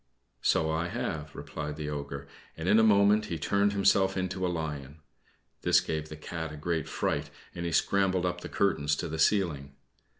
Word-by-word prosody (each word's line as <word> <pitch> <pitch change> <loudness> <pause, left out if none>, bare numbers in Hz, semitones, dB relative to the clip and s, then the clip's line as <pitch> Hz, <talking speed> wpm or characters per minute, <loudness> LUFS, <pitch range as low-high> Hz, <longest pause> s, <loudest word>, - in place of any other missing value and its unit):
"So 80 - +2
I 80 +2 0
have," 80 -3 -4
replied 75 -1 -5
the 75 -1 -4
Ogre, 70 -1 -5 0.3
and 80 +2 -4
in 105 +3 +6
a - - +5
moment 105 0 +5
he 85 - -3
turned 100 +6 +2
himself 95 -1 +3
into 95 0 -2
a 90 - +2
lion. 75 -3 -4 0.6
This - - +5
gave 80 -1 -3
the 75 - -8
Cat 80 0 -5
a 75 - -8
great 80 0 -2
fright, - - -1 0.2
and 85 0 -4
he - - -2
scrambled 95 +1 +2
up 90 0 -2
the - - -7
curtains 75 -7 +1
to - - -3
the 80 0 -5
ceiling. 80 -7 +1
80 Hz, 190 wpm, -29 LUFS, 75-95 Hz, 0.6 s, in